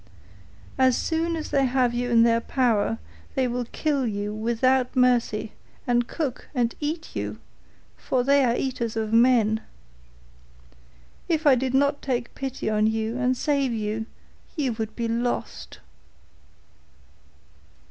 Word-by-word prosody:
As 260 -1 +4
soon 330 +1 -1
as 315 -1 -5
they 275 -1 +3
have 250 -1 +1
you 245 +1 -1
in 230 -1 +5
their 230 0 +3
power 230 -4 +1 0.4
they 260 -1 +2
will 245 0 -2
kill 280 0 -1
you 205 -1 -3
without 245 +4 +1
mercy, 240 -4 +2 0.3
and 240 -1 +1
cook 285 -7 -4
and 235 -2 +1
eat 315 +2 -4
you, - - -3 0.6
for 250 -1 0
they 280 +1 +4
are 240 -2 +2
eaters 240 -4 -2
of 220 0 -2
men. 230 -2 +4 1.7
If 320 -1 0
I 285 - +7
did 260 +1 0
not 280 +1 +2
take 245 -3 -2
pity 270 -1 -5
on 215 0 +2
you 220 +1 -1
and 255 0 +1
save 275 -2 0
you, 220 0 -3 0.5
you 275 -7 0
would 220 -1 -5
be 235 -1 -2
lost. 235 +2 -3
245 Hz, 135 wpm, -25 LUFS, 230-265 Hz, 1.7 s, I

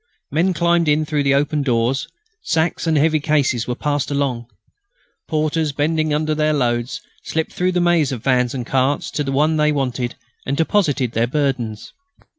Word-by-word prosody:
Men 175 +5 +1
climbed 170 0 +2
in 150 +1 +2
through 150 -1 0
the 140 -1 +3
open 145 +1 +1
doors. 125 0 0 0.3
Sacks 165 - 0
and 160 -1 +2
heavy 155 +1 +3
cases 140 -6 +1
were 125 - -2
passed 145 0 -1
along. 135 -5 -1 0.8
Porters, 155 -1 0
bending 155 +2 0
under 155 +1 0
their 155 0 +1
loads, 120 -3 -1 0.2
slipped 160 0 -2
through 180 +1 0
the 180 - +1
maze 170 -5 +2
of 125 -4 -5
vans 125 -1 +1
and 125 -2 -4
carts 135 +3 0
to 150 - -1
the 135 - -3
one 155 +3 +2
they 150 0 +3
wanted 125 -4 -2 0.3
and 140 +1 -2
deposited 155 - +1
their 115 +1 +1
burdens. 125 -6 -2
145 Hz, 175 wpm, -20 LUFS, 130-155 Hz, 0.8 s, the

